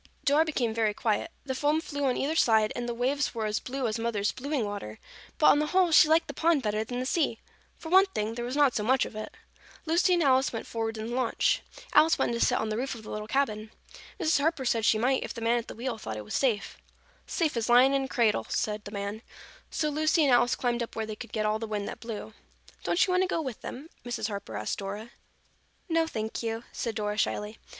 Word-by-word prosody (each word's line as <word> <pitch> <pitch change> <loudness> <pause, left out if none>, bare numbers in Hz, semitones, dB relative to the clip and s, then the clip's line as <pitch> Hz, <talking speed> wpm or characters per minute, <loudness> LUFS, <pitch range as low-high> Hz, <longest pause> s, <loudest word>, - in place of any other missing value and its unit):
Dora 295 +3 +5
became 250 -8 -1
very 220 -2 +1
quiet. 220 +8 0 0.2
The 265 - -2
foam 295 +4 +1
flew 285 -4 -3
on 255 -2 +1
either 300 +4 -1
side, 220 -7 +3
and 240 0 -3
the - - -1
waves 265 +3 0
were 225 -1 -2
as 210 0 0
blue 265 0 -4
as 220 +1 -2
Mother's 220 -3 0
blueing 275 -2 -2
water, 200 - -6 0.4
but 300 - +2
on 290 - +3
the 300 - 0
whole 365 +1 +3
she 310 -1 +7
liked 325 +1 +4
the - - -6
pond 325 -4 +2
better 215 0 0
than 245 +2 -5
the 255 - -2
sea. 275 -5 0 0.4
For 320 - -8
one 380 +3 +6
thing, 220 - -3
there 240 +1 -4
was 245 +3 -3
not 290 -4 +4
so - - 0
much 260 +4 +3
of - - -9
it. 215 - -6 0.5
Lucy 345 +3 +3
and 345 - +2
Alice 265 -1 +3
went 225 - -5
forward 225 -1 -3
in 220 +2 -5
the - - -2
launch. 255 -3 +1 0.3
Alice 320 +1 +6
wanted - - 0
to 235 - -2
sit - - +3
on 220 - -2
the 215 - -2
roof 260 +1 -2
of 220 - -11
the - - -9
little 210 0 -5
cabin. 220 -5 -1 0.5
Mrs. 320 -4 +2
Harper 295 -2 0
said 230 -2 +1
she 220 - +4
might 255 +4 +2
if - - -6
the - - -5
man 235 +1 +2
at 230 - -8
the - - -8
wheel 235 -1 -4
thought 110 - -5
it 105 - -7
was - - -7
safe. 235 -7 0 0.5
"Safe 320 -6 0
as 230 0 -1
lying 250 +3 +6
in 275 -1 +1
a - - -5
cradle," 235 -5 +1
said 210 -1 -2
the 205 - -7
man, 200 +1 -4 0.5
so 305 - -1
Lucy 310 +2 +2
and 275 -3 +4
Alice 245 0 +4
climbed 240 -1 -1
up 235 - -5
where 220 - -2
they 215 0 -6
could 235 +2 -9
get 215 -1 -1
all 215 +1 +1
the 225 - -4
wind 210 -1 -3
that - - -6
blew. 225 -1 -7 0.5
"Don't 345 - +3
you 370 - -2
want 365 - +3
to 375 - +2
go 345 - -1
with 260 -8 -5
them?" 275 +5 -7 0.2
Mrs. 240 -3 -3
Harper 200 -1 -5
asked - - -3
Dora. 205 +4 -6 0.8
"No, 330 -2 +2
thank 220 -6 -4
you," 225 0 -3
said 230 -2 -3
Dora 210 -1 -2
shyly. 210 0 -2
240 Hz, 255 wpm, -28 LUFS, 220-285 Hz, 0.8 s, she